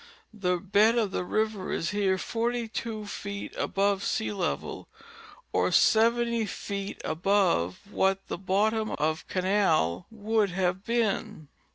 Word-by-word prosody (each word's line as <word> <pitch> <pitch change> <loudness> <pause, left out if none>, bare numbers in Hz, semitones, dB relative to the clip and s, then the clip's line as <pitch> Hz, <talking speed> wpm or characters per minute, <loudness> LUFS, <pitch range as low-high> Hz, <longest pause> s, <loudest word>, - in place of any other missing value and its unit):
The 180 -4 0
bed 205 +5 +3
of 215 -4 +1
the - - -1
river 215 0 -1
is 165 - -1
here 200 -2 +1
"42 230 0 -3
feet 200 0 -6
above 200 0 0
sea 220 - -1
level, 190 -4 -3 0.7
or - - +2
70 235 0 +3
feet 200 0 -5
above 170 - +1
what 195 -1 +1
the - - -4
bottom 215 +3 +1
of 155 +1 -1
canal 185 - +1
would 220 -1 0
have 185 +1 -1
been. 215 -8 -1
200 Hz, 125 wpm, -28 LUFS, 185-220 Hz, 0.7 s, bed